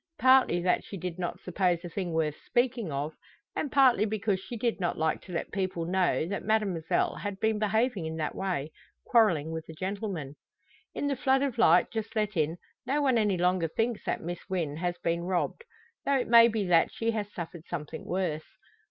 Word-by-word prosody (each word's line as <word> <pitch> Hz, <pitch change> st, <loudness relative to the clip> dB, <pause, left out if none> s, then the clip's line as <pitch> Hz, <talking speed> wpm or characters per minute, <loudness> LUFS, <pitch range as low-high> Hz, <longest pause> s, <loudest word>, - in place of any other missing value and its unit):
Partly 260 Hz, -9 st, +5 dB
that 180 Hz, -, +2 dB
she 200 Hz, -, -8 dB
did 180 Hz, 0 st, -5 dB
not 175 Hz, -1 st, -3 dB
suppose 180 Hz, -1 st, 0 dB
the -, -, -5 dB
thing 180 Hz, 0 st, -3 dB
worth 160 Hz, -2 st, 0 dB
speaking 240 Hz, -, 0 dB
of, 145 Hz, +3 st, -3 dB, 0.4 s
and 290 Hz, -, -2 dB
partly 260 Hz, -7 st, +5 dB
because 210 Hz, -2 st, 0 dB
she 235 Hz, +5 st, -7 dB
did 230 Hz, -1 st, -1 dB
not 175 Hz, -2 st, -1 dB
like 160 Hz, 0 st, 0 dB
to -, -, -12 dB
let 170 Hz, -, -3 dB
people 185 Hz, -4 st, -2 dB
know 180 Hz, -2 st, +1 dB
that 195 Hz, +3 st, -4 dB
Mademoiselle 200 Hz, -7 st, 0 dB
had 205 Hz, -2 st, -5 dB
been 220 Hz, 0 st, +1 dB
behaving 215 Hz, -3 st, +1 dB
in 160 Hz, -, -4 dB
that 155 Hz, -1 st, -2 dB
way 175 Hz, -6 st, -2 dB, 0.3 s
quarrelling 175 Hz, -10 st, +3 dB
with 160 Hz, 0 st, -6 dB
a -, -, -7 dB
gentleman. 185 Hz, -6 st, -4 dB, 0.6 s
In -, -, -2 dB
the 285 Hz, -1 st, +1 dB
flood 265 Hz, +1 st, +2 dB
of 255 Hz, -4 st, -2 dB
light 175 Hz, -5 st, +5 dB
just 220 Hz, 0 st, -4 dB
let 210 Hz, -1 st, 0 dB
in, 160 Hz, +1 st, 0 dB, 0.3 s
no 285 Hz, +3 st, +1 dB
one 265 Hz, -5 st, +3 dB
any 205 Hz, -4 st, +2 dB
longer 180 Hz, -1 st, +2 dB
thinks 225 Hz, +7 st, -1 dB
that -, -, -1 dB
Miss 175 Hz, +1 st, -4 dB
Wynn 165 Hz, -6 st, -2 dB
has 175 Hz, +1 st, -2 dB
been 170 Hz, 0 st, -1 dB
robbed; 185 Hz, -, -2 dB, 0.4 s
though 280 Hz, -1 st, +2 dB
it 250 Hz, -, -1 dB
may 235 Hz, 0 st, +8 dB
be 220 Hz, -3 st, -1 dB
that 175 Hz, -2 st, +4 dB
she 230 Hz, 0 st, -1 dB
has 210 Hz, -2 st, -3 dB
suffered 170 Hz, -2 st, -7 dB
something 160 Hz, -2 st, -5 dB
worse. 175 Hz, -4 st, -3 dB
190 Hz, 200 wpm, -29 LUFS, 170-225 Hz, 0.6 s, may